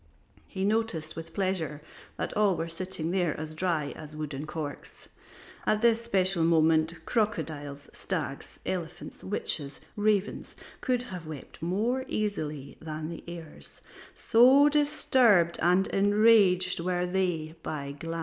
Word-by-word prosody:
He 190 0 -3
noticed 205 -8 0
with 165 0 -8
pleasure 185 -7 -1 0.4
that - - -3
all 205 -4 +3
were 165 - -2
sitting 170 -1 -3
there 180 -5 0
as 155 0 -5
dry 155 -3 -1
as 155 -1 -10
wooden 150 -1 -5
corks; 155 -2 -6 0.6
at 215 +1 +2
this 230 -1 +4
special 190 -6 +1
moment 160 0 +2
crocodiles, 150 - -2
stags, 145 -8 -4
elephants, 175 -2 -5
witches, 150 -7 -1 0.2
ravens 205 -1 0 0.3
could 250 -2 0
have 180 -9 -8
wept 150 -3 -9
more 220 +10 0
easily 155 -10 -3
than 155 0 -5
the 170 - -8
heirs, 170 -3 -10 0.3
so 260 +5 +6
disturbed 250 - +3
and 180 +3 +4
enraged 200 -3 +4
were 180 +1 0
they 180 -4 -1
by 140 -3 -4
Glanz. 165 +1 -4
175 Hz, 130 wpm, -28 LUFS, 155-205 Hz, 0.6 s, so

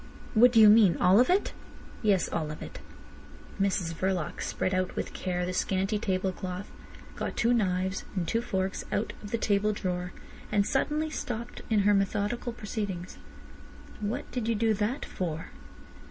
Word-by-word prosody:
"What 240 +2 +7
do 230 - +5
you 215 - +9
mean? 210 -6 +7
All 185 +4 +5
of 250 - +4
it?" 380 +3 +2 0.5
"Yes. 200 -5 +3
All 160 -3 -2
of 155 - -6
it." - - -9 0.8
Mrs 185 -4 0
Verloc 185 -1 -2
spread 185 - -1
out 185 0 0
with - - -3
care 180 -1 -2
the 180 - -3
scanty 195 +3 0
table 190 -3 0
cloth, 185 +1 -6 0.4
got - - -4
two 235 +1 +3
knives 190 -4 0
and 175 -3 -1
two 230 - +1
forks 190 -5 -2
out 210 - -1
of 205 - -8
the 230 - 0
table 210 -1 +1
drawer, 180 -3 -3 0.4
and 205 -1 +3
suddenly 300 +6 0
stopped 235 -5 -5
in 215 -3 +3
her 205 +1 +4
methodical 205 +4 0
proceedings. 205 -5 -5 0.8
"What 210 +2 -2
did 245 -3 -2
you 230 - +2
do 220 +1 +2
that 215 +6 -1
for?" 165 -3 -4
200 Hz, 170 wpm, -29 LUFS, 185-225 Hz, 0.8 s, you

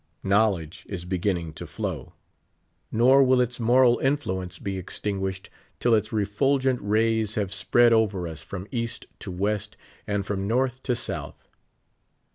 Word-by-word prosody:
Knowledge 95 -5 +1
is 90 -3 -5
beginning 90 -3 -1
to - - -8
flow,; - - -5 0.8
nor 125 +4 +5
79 135 - +5
Vil| - - +4
its 125 0 -2
moral 120 +1 +4
influence 95 -11 -1
be 95 -1 -4
extinguished 95 0 -4 0.3
till 120 - +3
its 110 - +2
refulgent 125 +5 +1
ray? 110 +2 +2
X 110 -1 -2
have 100 -2 -1
spread 120 +4 +4
over 100 -6 +1
us 80 -2 -7
from 95 -1 -7
East 115 -2 -3
to - - -7
West 105 +4 -2 0.3
and 100 -1 -1
from 100 -1 -2
Nort^ 130 +2 0
to 125 -2 0
South. - - -5
105 Hz, 150 wpm, -25 LUFS, 95-120 Hz, 0.8 s, nor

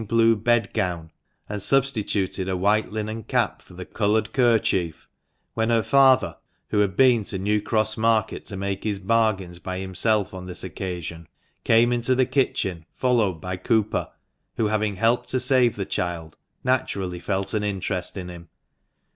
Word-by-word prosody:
blue 115 +1 +4
bedgown,* 100 -7 0 0.4
and 105 -1 -5
substituted 105 -8 0
a 95 - -1
white 105 +4 +1
linen 110 +1 -4
cap - - 0
for 90 - -17
the 90 0 -7
coloured 105 +1 0
kerchief, 110 - +1 0.5
when 110 0 0
her 115 -1 +3
father, 130 - +4 0.3
who 105 - +1
had 100 -3 +1
been 125 -4 +5
to 95 - -4
New 105 +2 0
Cross 110 0 +1
Market 110 -1 +1
to 100 - -6
make 100 0 -3
his 105 -2 -1
bargains 95 -4 0
by 95 0 -5
himself 95 +2 -1
on 90 -1 -8
this 90 - -7
occasion, 85 -3 -6 0.4
came 115 +2 +4
into 120 +1 +1
the 130 0 +3
kitchen, 95 - -1
followed 115 -7 +1
by 90 +2 -4
Cooper, 110 +3 0 0.5
who 115 - +1
having 105 -1 0
helped 115 +5 +1
to 130 - 0
save 125 -2 +3
the 100 - -3
child, 85 -4 -4 0.3
naturally 95 -8 -1
felt 95 +1 -3
an 105 -1 0
interest 95 -2 -3
in 90 -2 -5
him. 85 -2 -10
105 Hz, 160 wpm, -24 LUFS, 95-115 Hz, 0.5 s, been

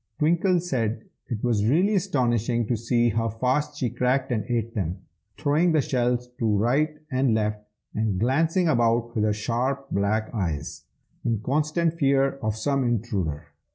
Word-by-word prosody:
Twinkle 175 +4 +2
said 115 -10 -2 0.2
it 110 -3 -4
was 115 -4 +1
really 180 - +3
astonishing 120 - +1
to 120 - 0
see 120 +1 +1
how 115 +1 0
fast 130 +7 -1
she 125 -5 -1
cracked 130 +1 0
and 110 -3 0
ate 115 -2 -1
them, 95 -2 -3 0.3
throwing 155 +4 +2
the 155 - +4
shells 125 -1 0
to 110 -3 +2
right 145 +8 +1
and 130 -3 +2
left, 105 -1 -1 0.3
and 105 -4 -1
glancing 160 - +2
about 120 -4 +2
with 110 - 0
her 105 - +2
sharp 125 +6 -2
black 105 +3 0
eyes, 85 -9 -3 0.4
in 115 -3 0
constant 155 +5 0
fear 135 -1 +2
of 110 -1 -1
some 135 +5 0
intruder. 95 -11 -2
120 Hz, 155 wpm, -25 LUFS, 110-140 Hz, 0.4 s, the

